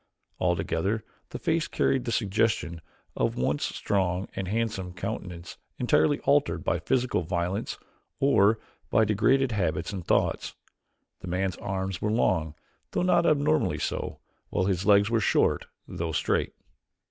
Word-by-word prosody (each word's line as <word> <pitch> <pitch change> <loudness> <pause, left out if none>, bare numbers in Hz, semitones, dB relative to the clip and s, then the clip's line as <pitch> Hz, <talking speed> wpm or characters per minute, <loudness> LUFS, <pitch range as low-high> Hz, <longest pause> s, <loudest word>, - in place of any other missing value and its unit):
Altogether 100 +7 0 0.3
the - - -5
face 160 -1 0
carried 130 -2 +1
the 115 - -2
suggestion 100 -6 0 0.3
of - - 0
a - - -3
once 70 +3 0
strong 95 -1 -1
and 95 - -3
handsome 105 -4 -2
countenance 90 -2 -6 0.2
entirely 140 +4 +3
altered 145 +1 +2
by - - 0
physical 125 -6 +1
violence 90 +5 -2 0.4
or 110 -6 +4 0.3
by 110 - +4
degraded 125 +5 +3
habits 85 -2 -1
and 95 -3 -4
thoughts. - - +1 0.6
The - - -9
man's 90 +1 -1
arms 95 -2 -3
were 105 - 0
long, 80 -8 +1 0.3
though - - -1
not 180 -1 +3
abnormally 145 - +2
so, - - -3 0.3
while 95 - 0
his 95 0 0
legs 100 +1 +5
were 115 - +3
short, - - +2 0.2
though 80 -1 -4
straight. - - 0
100 Hz, 140 wpm, -27 LUFS, 90-115 Hz, 0.6 s, legs